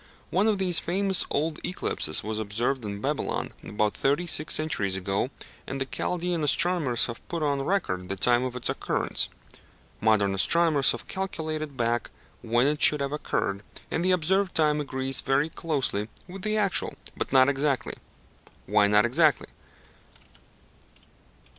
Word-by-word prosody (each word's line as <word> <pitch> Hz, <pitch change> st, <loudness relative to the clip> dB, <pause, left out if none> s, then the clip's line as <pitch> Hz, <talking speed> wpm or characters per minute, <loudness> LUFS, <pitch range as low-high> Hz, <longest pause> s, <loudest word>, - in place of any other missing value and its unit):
One 205 Hz, +3 st, +2 dB
of 215 Hz, -2 st, +2 dB
these 180 Hz, -3 st, +3 dB
famous 190 Hz, +1 st, +2 dB
old 155 Hz, +2 st, -1 dB
eclipses 170 Hz, -, -1 dB
was 110 Hz, +1 st, -3 dB
observed 115 Hz, +5 st, -1 dB
in 100 Hz, -1 st, -5 dB
Babylon -, -, -2 dB
about 105 Hz, 0 st, -1 dB
thirty 145 Hz, +6 st, 0 dB
six 155 Hz, -2 st, +2 dB
centuries 155 Hz, -12 st, 0 dB
ago, 100 Hz, +5 st, -1 dB, 0.4 s
and 135 Hz, -, -4 dB
the 135 Hz, -, -1 dB
Chaldæan 175 Hz, +4 st, -2 dB
astronomers 150 Hz, -4 st, +2 dB
have 115 Hz, -, -8 dB
put 165 Hz, -2 st, -3 dB
on 140 Hz, -2 st, 0 dB
record 95 Hz, -, -1 dB
the 95 Hz, -, -2 dB
time 120 Hz, +5 st, +2 dB
of 130 Hz, -1 st, -4 dB
its 125 Hz, -, -3 dB
occurrence. -, -, -1 dB, 0.7 s
Modern 105 Hz, -2 st, +2 dB
astronomers 155 Hz, -, +3 dB
have 120 Hz, -, -8 dB
calculated 155 Hz, -6 st, -4 dB
back 120 Hz, 0 st, 0 dB, 0.3 s
when 120 Hz, +2 st, +2 dB
it 150 Hz, +1 st, 0 dB
should 150 Hz, -, +6 dB
have 140 Hz, 0 st, -2 dB
occurred, 100 Hz, -9 st, -2 dB, 0.3 s
and 165 Hz, -, -1 dB
the 185 Hz, -, +1 dB
observed 185 Hz, +2 st, +1 dB
time 150 Hz, -1 st, +3 dB
agrees 135 Hz, -1 st, -1 dB
very 140 Hz, +3 st, +1 dB
closely 135 Hz, -11 st, -1 dB, 0.2 s
with 190 Hz, +1 st, -9 dB
the 215 Hz, +2 st, -1 dB
actual, 200 Hz, -3 st, +2 dB, 0.2 s
but -, -, -4 dB
not 130 Hz, -1 st, +6 dB
exactly. 140 Hz, -1 st, 0 dB, 0.7 s
Why 105 Hz, -1 st, +3 dB
not 105 Hz, +2 st, +4 dB
exactly? 150 Hz, +3 st, +2 dB
140 Hz, 150 wpm, -26 LUFS, 115-170 Hz, 0.7 s, should